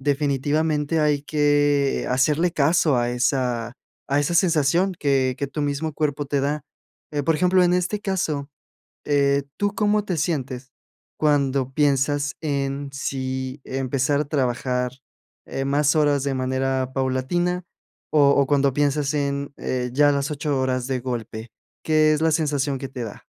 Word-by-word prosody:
Definitivamente 145 Hz, +2 st, 0 dB
hay 150 Hz, -2 st, +2 dB
que, 145 Hz, -2 st, +2 dB
eh, -, -, -5 dB
hacerle 150 Hz, +7 st, +2 dB
caso 155 Hz, -1 st, +3 dB
a 120 Hz, 0 st, +1 dB
esa 125 Hz, -1 st, -1 dB, 0.4 s
a 140 Hz, -, +3 dB
esa 145 Hz, +4 st, -1 dB
sensación 170 Hz, +1 st, +3 dB
que 135 Hz, -3 st, +1 dB
que 140 Hz, -, -2 dB
tu 150 Hz, -, -5 dB
mismo 145 Hz, +2 st, -2 dB
cuerpo 145 Hz, -1 st, -1 dB
te 140 Hz, 0 st, -1 dB
da. 145 Hz, +1 st, -1 dB, 0.5 s
Eh, 145 Hz, -, -1 dB
por 160 Hz, +3 st, +2 dB
ejemplo, 180 Hz, +3 st, +3 dB
en 175 Hz, 0 st, +3 dB
este 180 Hz, +3 st, -1 dB
caso, 160 Hz, -8 st, -2 dB, 0.6 s
eh, 140 Hz, -1 st, +2 dB
¿tú 205 Hz, -1 st, 0 dB
cómo 210 Hz, -1 st, +1 dB
te 185 Hz, -, -2 dB
sientes 135 Hz, -5 st, -2 dB, 0.5 s
cuando 140 Hz, -3 st, +1 dB
piensas 145 Hz, 0 st, +1 dB
en 140 Hz, -2 st, -2 dB
si 130 Hz, 0 st, -4 dB
empezar 135 Hz, +2 st, -1 dB
a -, -, -3 dB
trabajar, 125 Hz, -3 st, -1 dB, 0.6 s
eh, 135 Hz, -, -3 dB
más 145 Hz, +2 st, +2 dB
horas 145 Hz, -2 st, +3 dB
de 140 Hz, -1 st, -1 dB
manera 130 Hz, 0 st, -1 dB
paulatina 140 Hz, +8 st, -1 dB, 0.5 s
o 145 Hz, -2 st, +5 dB
o 140 Hz, -, +4 dB
cuando 140 Hz, -2 st, +2 dB
piensas 145 Hz, 0 st, +1 dB
en, 140 Hz, -1 st, -2 dB
eh, 125 Hz, -1 st, -2 dB
ya 145 Hz, +1 st, +5 dB
las 140 Hz, 0 st, -1 dB
8 145 Hz, 0 st, -2 dB
horas 130 Hz, -1 st, 0 dB
de 130 Hz, -2 st, -1 dB
golpe, 115 Hz, -2 st, -5 dB, 0.3 s
qué 155 Hz, -1 st, +4 dB
es 155 Hz, -, -1 dB
la 160 Hz, -, +3 dB
sensación 145 Hz, -3 st, 0 dB
que 135 Hz, 0 st, -6 dB
te 125 Hz, -3 st, -6 dB
da? 110 Hz, -3 st, -8 dB
140 Hz, 155 wpm, -23 LUFS, 130-150 Hz, 0.6 s, o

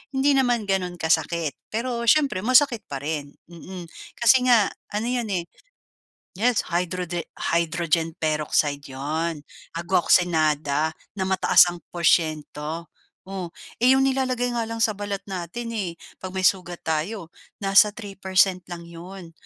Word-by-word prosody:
hindi 275 Hz, +2 st, +3 dB
naman 245 Hz, -4 st, +2 dB
gano'n 190 Hz, -3 st, -1 dB
kasakit. 160 Hz, -1 st, 0 dB
Pero 235 Hz, +1 st, -3 dB
siyempre 280 Hz, -6 st, +4 dB
masakit 240 Hz, +1 st, +3 dB
pa 140 Hz, -1 st, -6 dB
rin, 145 Hz, -2 st, -4 dB, 0.2 s
mm, 180 Hz, +2 st, -9 dB, 0.3 s
kasi 250 Hz, +2 st, +4 dB
nga 230 Hz, -5 st, +5 dB, 0.2 s
ano 215 Hz, +3 st, -1 dB
'yon, 245 Hz, -2 st, -1 dB
eh. 175 Hz, -, -1 dB, 1.0 s
Yes, 240 Hz, 0 st, +2 dB
hydrode 175 Hz, -1 st, -2 dB
hydrogen 165 Hz, -1 st, 0 dB
peroxide 150 Hz, -2 st, 0 dB
'yon 150 Hz, +3 st, -3 dB, 0.3 s
agua 175 Hz, +2 st, +1 dB
oxinada 155 Hz, -3 st, +2 dB, 0.2 s
na 190 Hz, -2 st, -3 dB
mataas 190 Hz, -1 st, +5 dB
ang 175 Hz, -, -4 dB, 0.2 s
porsiento. 160 Hz, -1 st, 0 dB, 0.4 s
Oh, 190 Hz, -2 st, -5 dB, 0.3 s
eh, 250 Hz, +2 st, +6 dB
'yong 270 Hz, -, +3 dB
nilalagay 255 Hz, -2 st, 0 dB
nga 230 Hz, -2 st, -2 dB
lang 230 Hz, 0 st, 0 dB
sa 215 Hz, -, +2 dB
balat 205 Hz, -1 st, -4 dB
natin, 195 Hz, +5 st, -5 dB
eh, 190 Hz, -7 st, -3 dB, 0.2 s
'pag 185 Hz, -, -5 dB
may 190 Hz, 0 st, -4 dB
sugat 180 Hz, -2 st, +1 dB
tayo 165 Hz, +3 st, -3 dB, 0.2 s
nasa 195 Hz, 0 st, +5 dB
3% 195 Hz, -3 st, 0 dB
lang 175 Hz, -1 st, -7 dB
'yon. 170 Hz, +1 st, -11 dB
185 Hz, 135 wpm, -24 LUFS, 165-225 Hz, 1.0 s, eh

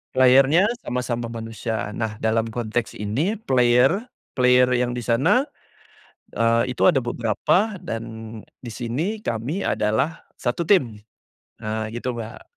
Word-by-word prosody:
Player-nya 135 Hz, +7 st, +5 dB, 0.2 s
sama-sama 120 Hz, -, -3 dB
manusia, 115 Hz, -2 st, -4 dB
nah 110 Hz, -1 st, -3 dB
dalam 110 Hz, +1 st, +1 dB
konteks 115 Hz, 0 st, -3 dB
ini 130 Hz, -, -1 dB
player 130 Hz, -, +2 dB, 0.2 s
player 125 Hz, 0 st, +4 dB
yang 125 Hz, 0 st, 0 dB
di 120 Hz, -, -4 dB
sana, 160 Hz, -, +3 dB, 0.9 s
eee, 115 Hz, +2 st, +2 dB
itu 130 Hz, -, +2 dB
ada 135 Hz, -8 st, +3 dB
beberapa 120 Hz, -, 0 dB
dan 115 Hz, 0 st, -4 dB, 0.6 s
di 120 Hz, -, -6 dB
sini 140 Hz, -, -3 dB
kami 135 Hz, -, -3 dB
adalah 110 Hz, +10 st, 0 dB, 0.2 s
satu 125 Hz, +7 st, -1 dB
tim, 120 Hz, -, +1 dB, 0.6 s
nah 110 Hz, 0 st, -2 dB
gitu 125 Hz, +1 st, -3 dB
Mbak. 110 Hz, 0 st, -8 dB
120 Hz, 125 wpm, -23 LUFS, 115-135 Hz, 0.9 s, Player-nya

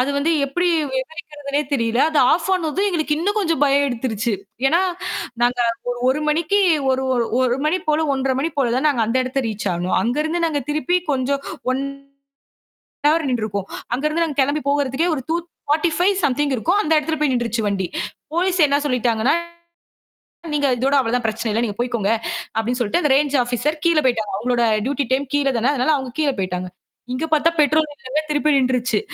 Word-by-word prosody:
அது 265 Hz, +3 st, +1 dB
வந்து 295 Hz, +4 st, +1 dB, 0.2 s
எப்படி 355 Hz, +6 st, 0 dB, 0.2 s
விவரிக்கிறதுனே 290 Hz, +1 st, -4 dB
தெரியல. 235 Hz, -3 st, 0 dB
அது 310 Hz, -, +1 dB
ஆஃப் 335 Hz, +3 st, 0 dB
ஆனதும் 365 Hz, +2 st, 0 dB
எங்களுக்கு 310 Hz, -4 st, 0 dB
இன்னும் 410 Hz, +6 st, 0 dB
கொஞ்சம் 330 Hz, -7 st, 0 dB
பயம் 280 Hz, 0 st, +3 dB
எடுத்துடுச்சு. 230 Hz, -2 st, -2 dB, 0.4 s
ஏன்னா, 335 Hz, +5 st, +3 dB, 0.6 s
நாங்க 245 Hz, +1 st, +2 dB, 0.3 s
ஒரு 245 Hz, -, -4 dB
1 295 Hz, +3 st, -1 dB
மணிக்கு 335 Hz, +6 st, +2 dB, 0.3 s
ஒரு 260 Hz, 0 st, +1 dB
ஒரு 240 Hz, -2 st, +1 dB, 0.2 s
1 255 Hz, -1 st, +2 dB
மணி 360 Hz, +4 st, +2 dB
போல 310 Hz, +1 st, +2 dB
1.5 265 Hz, -1 st, 0 dB
மணி 325 Hz, +4 st, -1 dB
போல 245 Hz, -4 st, +2 dB
தான் 265 Hz, -, +1 dB
நாங்க 245 Hz, -6 st, +1 dB
அந்த 230 Hz, +3 st, 0 dB
இடத்தை 260 Hz, +2 st, -1 dB
ரீச் 210 Hz, -1 st, -5 dB
ஆனோம். 180 Hz, +2 st, -1 dB
அங்க 240 Hz, +4 st, -1 dB
இருந்து 335 Hz, +2 st, -1 dB
நாங்க 295 Hz, -3 st, -1 dB
திருப்பிப் 340 Hz, +2 st, 0 dB
கொஞ்சம் 275 Hz, +1 st, -1 dB, 0.3 s
1 265 Hz, +1 st, -1 dB, 1.3 s
ஹவர் 315 Hz, 0 st, +2 dB
நின்றுருப்போம். 210 Hz, -5 st, -2 dB, 0.3 s
அங்க 265 Hz, +4 st, -3 dB
இருந்து 330 Hz, +2 st, +1 dB
நாங்க 295 Hz, -3 st, -5 dB
கிளம்பி 290 Hz, +3 st, 0 dB
போகறதுக்கு 285 Hz, +3 st, 0 dB
ஒரு 265 Hz, -, -4 dB
2.45 340 Hz, +2 st, 0 dB
சம்திங் 285 Hz, 0 st, +1 dB
இருக்கும். 350 Hz, -, +1 dB
அந்த 315 Hz, -, 0 dB
இடத்துல 315 Hz, +1 st, -2 dB
போய் 290 Hz, -3 st, +2 dB
நின்றுச்சு 235 Hz, -1 st, -1 dB
வண்டி. 195 Hz, -2 st, -1 dB, 0.5 s
போலீஸ் 365 Hz, +1 st, +1 dB
என்ன 285 Hz, +1 st, +2 dB
சொல்லிட்டாங்கன்னா 245 Hz, 0 st, +1 dB, 1.2 s
நீங்க 290 Hz, -1 st, +2 dB
இதோட 265 Hz, +3 st, 0 dB
அவ்வளவுதான் 245 Hz, -1 st, 0 dB
பிரச்சனை 220 Hz, +1 st, -2 dB
இல்ல. 225 Hz, +3 st, 0 dB
நீங்கப் 210 Hz, -1 st, -4 dB
போயிக்கோங்க 235 Hz, -4 st, 0 dB, 0.5 s
அப்படின்னு 235 Hz, +3 st, 0 dB
சொல்லிட்டு 240 Hz, +8 st, +1 dB
அந்த 295 Hz, -, +2 dB
ரேஞ்ச் 285 Hz, 0 st, +2 dB
ஆபிசர் 250 Hz, +6 st, -1 dB
கீழ 335 Hz, -2 st, +3 dB
போய்ட்டாங்க. 225 Hz, -4 st, 0 dB
அவங்களோட 240 Hz, +2 st, 0 dB, 0.2 s
டியூட்டி 280 Hz, 0 st, -1 dB
டைம் 275 Hz, +2 st, +1 dB
கீழ 285 Hz, -1 st, +2 dB
தான. 240 Hz, +5 st, +2 dB
அதனால 270 Hz, +2 st, +1 dB
அவங்க 260 Hz, -2 st, -6 dB
கீழ 295 Hz, -2 st, +2 dB
போயிட்டாங்க. 180 Hz, -1 st, -3 dB, 0.5 s
இங்க 295 Hz, +5 st, -2 dB
பார்த்தா 310 Hz, +2 st, +4 dB
பெட்ரோல் 305 Hz, +1 st, +2 dB
இல்லங்க. 270 Hz, +4 st, -2 dB
திருப்பி 300 Hz, 0 st, +2 dB
நின்றுச்சு. 255 Hz, -1 st, +1 dB
275 Hz, 175 wpm, -20 LUFS, 245-310 Hz, 1.3 s, பார்த்தா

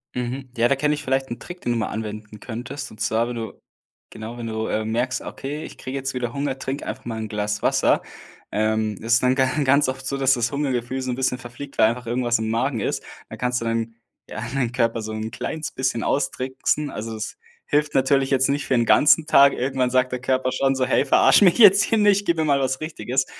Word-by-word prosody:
Mhm. 125 Hz, +1 st, -4 dB
Ja, 115 Hz, +1 st, +3 dB
da 140 Hz, -, +2 dB
kenne 150 Hz, +2 st, +1 dB
ich 150 Hz, -, -5 dB
vielleicht 135 Hz, -1 st, -1 dB
'n 120 Hz, -, -5 dB
Trick, 175 Hz, +4 st, -10 dB
den 120 Hz, -, -1 dB
du 120 Hz, -, 0 dB
mal 110 Hz, -, -1 dB
anwenden 105 Hz, 0 st, -6 dB
könntest. 130 Hz, +5 st, -7 dB
Und 110 Hz, -, -14 dB
zwar, 115 Hz, +2 st, +1 dB
wenn 120 Hz, -, -5 dB
du 115 Hz, -1 st, -5 dB, 0.6 s
genau, 110 Hz, +2 st, -8 dB
wenn 120 Hz, -, -6 dB
du, 110 Hz, 0 st, -3 dB
äh, 110 Hz, 0 st, -1 dB
merkst: 120 Hz, +4 st, -1 dB
„Okay, 145 Hz, +3 st, -6 dB
ich -, -, -10 dB
kriege 130 Hz, +1 st, -5 dB
jetzt 135 Hz, 0 st, -3 dB
wieder 120 Hz, -2 st, -3 dB
Hunger“, 140 Hz, -1 st, -2 dB
trinke 135 Hz, +2 st, -4 dB
einfach -, -, -6 dB
mal 115 Hz, -2 st, -4 dB
'n 110 Hz, -, -4 dB
Glas 105 Hz, 0 st, -2 dB
Wasser, -, -, +2 dB, 0.5 s
ähm, 110 Hz, 0 st, 0 dB
das 115 Hz, +1 st, 0 dB
ist 120 Hz, -, +4 dB
dann 125 Hz, 0 st, +4 dB
ga 130 Hz, 0 st, +3 dB, 0.2 s
ganz 140 Hz, 0 st, +3 dB
oft 130 Hz, 0 st, -5 dB
so, 140 Hz, +1 st, -2 dB
dass 135 Hz, 0 st, +3 dB
das 120 Hz, -1 st, -1 dB
Hungergefühl 130 Hz, -3 st, -2 dB
so 130 Hz, -, -4 dB
'n 125 Hz, -, -1 dB
bisschen 130 Hz, -1 st, -1 dB
verfliegt, 130 Hz, +3 st, -10 dB
weil 110 Hz, -, +6 dB
einfach 125 Hz, +2 st, -5 dB
irgendwas 120 Hz, 0 st, 0 dB
im 110 Hz, 0 st, -3 dB
Magen 120 Hz, +2 st, 0 dB
ist, -, -, -2 dB, 0.3 s
dann -, -, -9 dB
kannst 125 Hz, 0 st, 0 dB
du -, -, -4 dB
dann 115 Hz, 0 st, -2 dB, 0.3 s
ja -, -, -6 dB
deinen 130 Hz, -4 st, 0 dB
Körper 115 Hz, -2 st, 0 dB
so 110 Hz, 0 st, -5 dB
'n 110 Hz, +1 st, -4 dB
kleines 155 Hz, -1 st, -4 dB
bisschen 130 Hz, -3 st, -1 dB
austricksen. 135 Hz, +1 st, -1 dB
Also, 110 Hz, +1 st, -5 dB
es 110 Hz, 0 st, -6 dB, 0.3 s
hilft 150 Hz, 0 st, 0 dB
natürlich 135 Hz, 0 st, +3 dB
jetzt 135 Hz, 0 st, +2 dB
nicht 140 Hz, +1 st, -1 dB
für 130 Hz, -, +2 dB
'n 120 Hz, -1 st, +2 dB
ganzen 150 Hz, +6 st, +5 dB
Tag. 140 Hz, -3 st, +6 dB
Irgendwann 130 Hz, 0 st, 0 dB
sagt 130 Hz, 0 st, +2 dB
der 125 Hz, -1 st, -4 dB
Körper 130 Hz, 0 st, 0 dB
schon 135 Hz, +1 st, +1 dB
so: 130 Hz, -1 st, +1 dB
„Hey, 130 Hz, -, +2 dB
verarsch -, -, +6 dB
mich 180 Hz, -4 st, +5 dB
jetzt 200 Hz, -3 st, +8 dB
hier 225 Hz, -, +1 dB
nicht, 205 Hz, -1 st, +3 dB
gib 170 Hz, -1 st, +2 dB
mir 160 Hz, -, +1 dB
mal 140 Hz, -2 st, +3 dB
was 130 Hz, +1 st, -1 dB
Richtiges.“ 135 Hz, -4 st, -2 dB
130 Hz, 240 wpm, -23 LUFS, 115-135 Hz, 0.6 s, jetzt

